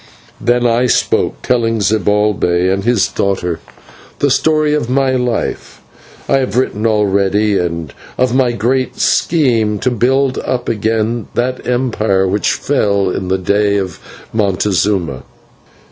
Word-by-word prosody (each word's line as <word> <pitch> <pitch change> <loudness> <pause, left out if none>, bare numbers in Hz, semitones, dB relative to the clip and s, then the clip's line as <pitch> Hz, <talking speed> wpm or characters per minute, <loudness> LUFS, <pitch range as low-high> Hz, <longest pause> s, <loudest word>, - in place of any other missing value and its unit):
Then 120 0 +2
I 120 +1 +2
spoke, - - 0
telling 115 -2 +1
to 105 - -1
Zibalbay 95 -2 +1
and 95 0 -2
his 120 -3 +2
daughter 90 -4 -2 0.6
the - - +1
story 155 -1 +2
of 150 -6 -1
my 135 +1 +2
life, 125 -3 -2 0.5
whereof - - +2
I - - +3
have 125 -4 -2
written 115 -4 0
already, 105 -1 +1
and 85 -3 -3 0.2
of 125 -1 +1
my 130 -2 +2
great 125 +3 -1
scheme 115 -10 +2
to 125 +5 -1
build 130 +3 +1
up 125 -1 -3
again 110 0 -1
that 125 +1 -2
empire 110 -6 +1
which 100 +2 0
fell 100 -8 0
in 95 - -3
the 95 +1 +1
day 100 +2 +1
of 95 -3 -4 0.3
Montezuma. 100 - 0
110 Hz, 140 wpm, -15 LUFS, 100-125 Hz, 0.6 s, I